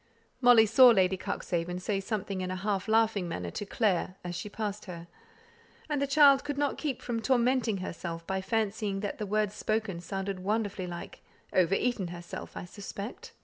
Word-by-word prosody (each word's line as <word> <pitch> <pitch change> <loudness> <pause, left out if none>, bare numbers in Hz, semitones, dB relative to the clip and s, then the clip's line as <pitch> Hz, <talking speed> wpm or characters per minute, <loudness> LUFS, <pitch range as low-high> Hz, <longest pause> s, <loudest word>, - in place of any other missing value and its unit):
Molly 245 -3 +7
saw 250 +4 +7
Lady 190 -4 +4
Cuxhaven 175 -1 -3
say 195 +2 -1
something 195 -1 -3
in 185 - -3
a 185 - -2
half 195 +1 -2
laughing 220 -4 +2
manner 90 - -4
to 205 - -5
"Clare," 190 -4 0
as 175 0 -4
she 210 - -5
passed 210 -1 -4
her; 170 -3 -8 0.9
and 290 -2 0
the 280 - +1
child 275 -1 +6
could 290 -1 -4
not 285 -1 0
keep 285 -5 -3
from 230 -2 -2
tormenting 245 -3 +2
herself 170 -2 -5
by 190 +1 -2
fancying 210 -1 -1
that 205 +1 -4
the 210 - -3
words 210 0 0
spoken 215 -4 -2
sounded 195 +1 -4
wonderfully 205 -1 -1
like 175 0 -8 0.3
"Over 185 +1 +3
eaten 235 -6 0
herself, 175 0 -8
I - - -5
suspect." 200 +4 -8
205 Hz, 180 wpm, -29 LUFS, 185-225 Hz, 0.9 s, Molly